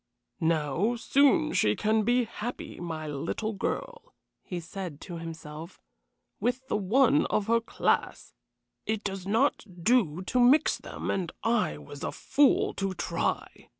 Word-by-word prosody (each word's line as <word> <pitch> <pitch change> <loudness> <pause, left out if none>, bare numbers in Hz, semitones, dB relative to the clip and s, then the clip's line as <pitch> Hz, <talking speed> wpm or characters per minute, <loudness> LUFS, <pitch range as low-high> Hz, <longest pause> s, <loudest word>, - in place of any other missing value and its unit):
"Now, 165 - +1
soon 290 +6 +3
she 105 0 +3
can 215 +1 +2
be 245 +3 +3
happy 235 +1 -6
my 160 -2 -5
little 165 +9 -3
girl," 480 - -4 0.3
he 180 - -5
said 170 -2 -7
to 175 -3 -7
himself, 160 0 -8 0.6
"with 255 +2 -1
the - - -1
one 210 - +3
of 210 - 0
her 230 +2 +3
class. 230 - -1 0.5
It 220 -1 -1
does 195 -1 -4
not 230 +8 +2 0.2
do 190 -7 +2
to 250 - 0
mix 255 +5 +5
them, - - -5
and 180 -4 -2
I 225 - +1
was 75 - -10
a - - -2
fool 360 +9 +2
to 195 -1 -1
try. - - -3
205 Hz, 145 wpm, -28 LUFS, 165-245 Hz, 0.6 s, mix